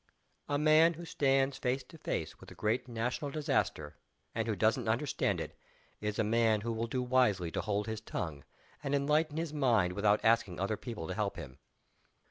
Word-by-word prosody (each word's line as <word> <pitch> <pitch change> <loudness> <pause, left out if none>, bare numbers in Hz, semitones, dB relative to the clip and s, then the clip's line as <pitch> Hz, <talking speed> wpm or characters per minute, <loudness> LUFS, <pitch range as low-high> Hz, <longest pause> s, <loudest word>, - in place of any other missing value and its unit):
A 145 - +1
man 155 +3 +5
who 170 +2 -8
stands 135 -3 +1
face 130 +1 0
to 160 - -14
face - - -3
with - - -13
a - - -12
great 110 +4 0
national 120 +4 -2
disaster, 80 - -1 0.4
and - - -1
who - - 0
doesn't - - +1
understand - - 0
it, - - -6 0.4
is 105 0 -3
a 110 - +2
man 110 0 +2
who 115 +1 -2
will 115 +1 -2
do 125 +2 -1
wisely 120 -9 +2
to - - -1
hold 105 -1 -1
his 110 -1 -4
tongue 80 -10 -5 0.4
and 140 0 0
enlighten 150 +2 +1
his 165 -2 -2
mind 115 -11 +2
without 105 +2 +3
asking 110 -7 +3
other 100 +3 0
people 110 -9 -6
to 95 - -3
help 100 0 -1
him. 65 -3 -9
115 Hz, 190 wpm, -32 LUFS, 105-140 Hz, 0.4 s, man